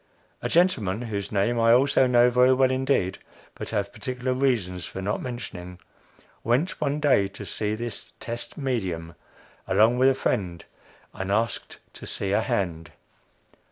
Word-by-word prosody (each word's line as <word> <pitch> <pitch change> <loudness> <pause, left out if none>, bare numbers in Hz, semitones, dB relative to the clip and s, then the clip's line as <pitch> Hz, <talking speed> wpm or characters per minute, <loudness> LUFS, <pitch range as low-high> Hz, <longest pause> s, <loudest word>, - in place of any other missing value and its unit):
A - - -2
gentleman, 120 - +2
whose 100 -4 -4
name 105 +3 +1
I 115 0 +5
also 130 +1 +4
know 120 0 +5
very 125 +1 +5
well 130 0 +3
indeed, 130 -8 0 0.3
but - - -7
have 100 -2 -2
particular 130 -1 -3
reasons 115 -10 0
for 95 - -6
not 100 +2 -2
mentioning, 90 -8 -7 0.6
went 130 +12 0
one 145 0 0
day 135 -10 +3
to 100 +1 -9
see 105 +4 -2
this 115 -1 -5
"test 120 0 -5
medium," 95 - -2 0.5
along 115 +3 +4
with 130 +1 +6
a 135 - +2
friend, 90 -9 -2 0.5
and 95 +1 -4
asked 115 +3 -1 0.2
to - - -9
see 95 - -2
a 105 +2 +3
hand. 85 -7 -2
115 Hz, 155 wpm, -25 LUFS, 95-130 Hz, 0.6 s, with